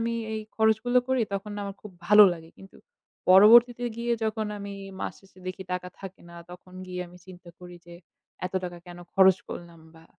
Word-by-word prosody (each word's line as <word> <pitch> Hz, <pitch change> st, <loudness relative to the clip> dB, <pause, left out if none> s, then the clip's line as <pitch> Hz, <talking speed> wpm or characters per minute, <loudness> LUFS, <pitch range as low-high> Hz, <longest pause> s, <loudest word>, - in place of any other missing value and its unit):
আমি 230 Hz, 0 st, -1 dB, 0.2 s
এই 220 Hz, -, -3 dB, 0.2 s
খরচগুলো 220 Hz, +3 st, +3 dB
করি 260 Hz, -2 st, +2 dB
তখন 200 Hz, +1 st, -5 dB
আমার 200 Hz, -1 st, -6 dB
খুব 210 Hz, -, -10 dB, 0.2 s
ভালো 210 Hz, 0 st, +9 dB
লাগে। 165 Hz, -1 st, -10 dB
কিন্তু 195 Hz, -, -15 dB, 0.5 s
পরবর্তীতে 235 Hz, +5 st, +7 dB
গিয়ে 235 Hz, 0 st, -1 dB
যখন 220 Hz, 0 st, -2 dB
আমি 200 Hz, 0 st, -7 dB, 0.3 s
মাস -, -, -4 dB
শেষে 190 Hz, -1 st, -22 dB
দেখি 185 Hz, +1 st, -5 dB
টাকা 180 Hz, 0 st, -4 dB
থাকে 195 Hz, -1 st, -10 dB
না। 170 Hz, -, -12 dB
তখন 180 Hz, +1 st, -13 dB
গিয়ে 180 Hz, 0 st, -6 dB
আমি 180 Hz, -, -16 dB
চিন্তা 180 Hz, -1 st, -13 dB
করি 180 Hz, -1 st, -12 dB
যে 170 Hz, -, -12 dB, 0.5 s
এত 185 Hz, -, -11 dB
টাকা 175 Hz, -1 st, -7 dB
কেন 175 Hz, 0 st, -11 dB, 0.2 s
খরচ 190 Hz, -1 st, +6 dB
করলাম 170 Hz, -1 st, -9 dB
বা 160 Hz, 0 st, -17 dB
195 Hz, 190 wpm, -26 LUFS, 180-220 Hz, 0.5 s, ভালো